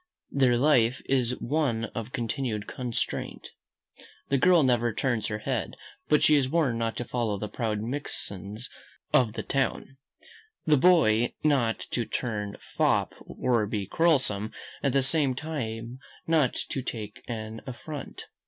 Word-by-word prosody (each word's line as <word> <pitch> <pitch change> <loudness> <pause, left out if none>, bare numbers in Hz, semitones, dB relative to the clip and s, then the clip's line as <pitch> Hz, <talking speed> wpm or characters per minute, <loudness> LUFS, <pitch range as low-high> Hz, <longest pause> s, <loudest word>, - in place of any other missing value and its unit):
Their 130 -3 +3
life 125 -3 +4
is 125 -2 +1
one 130 -5 0
of 115 +1 -5
continued 115 -3 -2
constraint. 125 -3 -4 0.8
The 140 - +2
girl 175 +1 +5
never 120 -2 +2
turns 110 -2 -1
her 105 - -2
head, 110 - -3 0.3
but 150 - +4
she 155 - +6
is 135 -3 +2
warned 135 -7 +1
not 115 -1 -1
to 120 - -3
follow 115 -5 -1
the 105 - -4
proud 105 -1 -2
minxes 110 -4 -5 0.5
of 115 -4 +4
the - - -4
town. 135 0 -1 0.7
The 155 - +5
boy 170 -6 +6
is - - -3
not 135 -7 +2
to 120 - 0
turn 105 -4 -3 0.2
fop, - - +2
or 120 -4 0
be 105 -2 -2
quarrelsome, 130 - +2 0.3
at 140 -3 +1
the 135 -1 +3
same 135 -2 +3
time 125 -5 -5 0.3
not 155 -6 +2
to 135 - -2
take 105 -4 -6
an 110 -1 -5
affront. 140 +3 -7
120 Hz, 145 wpm, -27 LUFS, 110-140 Hz, 0.8 s, she